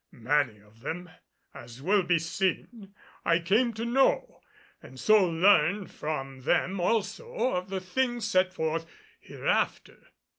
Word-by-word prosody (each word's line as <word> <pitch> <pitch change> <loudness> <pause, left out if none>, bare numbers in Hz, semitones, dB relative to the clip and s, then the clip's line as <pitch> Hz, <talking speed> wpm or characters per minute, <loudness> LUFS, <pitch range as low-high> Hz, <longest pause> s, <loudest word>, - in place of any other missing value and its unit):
Many 125 -1 0
of 105 +2 -23
them, 180 +8 -6 0.4
as 120 +1 -11
will 195 +8 +2
be 175 -1 +2
seen, 195 +5 -3 0.3
I 165 - +3
came 210 +8 +2
to 225 +2 -3
know 270 - +1 0.4
and 130 - -13
so 215 +4 +5
learned 180 +2 +3
from 135 -3 -5
them 180 +7 0
also 255 - -1
of 180 +1 -3
the 190 0 -2
things 240 +4 -1
set 185 0 +2
forth 165 -1 -2 0.3
hereafter. - - -2
180 Hz, 135 wpm, -28 LUFS, 155-210 Hz, 0.4 s, so